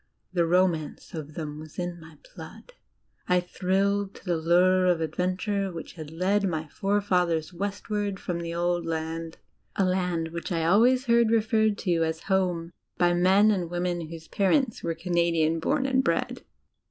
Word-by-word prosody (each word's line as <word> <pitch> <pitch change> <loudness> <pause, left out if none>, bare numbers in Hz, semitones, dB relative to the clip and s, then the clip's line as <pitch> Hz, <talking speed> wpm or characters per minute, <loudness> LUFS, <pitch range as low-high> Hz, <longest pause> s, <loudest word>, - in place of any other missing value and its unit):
The 170 -2 +2
ro 180 +2 +5
mance 155 -4 -6
of 155 -2 -7
them 150 -2 -5
was 155 -1 -12
in 175 -1 -4
my 160 -1 -14 0.2
blood; - - -11 0.6
I 180 0 +4
thrilled 195 +2 0
to - - -15
the 175 -2 +1
lure 180 +3 +3
of 175 -2 +3
adventure 185 +5 -1
which 165 -2 -8
had 155 -3 -8
led 185 +6 +1
my 160 -3 -3
forefathers 180 -5 0
westward 200 +1 -3
from 175 -2 -3
the 170 0 -4
Old 175 0 0
Land 165 0 -4 0.4
a 195 - +2
land 180 -3 0
which 170 +3 -6
I 165 -2 0
always 245 +9 +4
heard 235 -2 +4
referred 220 -1 +2
to 170 -3 +2
as 160 0 -2
"Home," 180 -3 0 0.3
by 175 0 +3
men 190 +4 +4
and 180 -5 -1
women 175 -1 -2
whose 165 -1 -9
parents 225 +5 +1
were 165 -1 -2
Canadian 165 -2 +1
born 270 - 0
and 265 -1 +2
bred. - - -1
180 Hz, 165 wpm, -26 LUFS, 165-200 Hz, 0.6 s, ro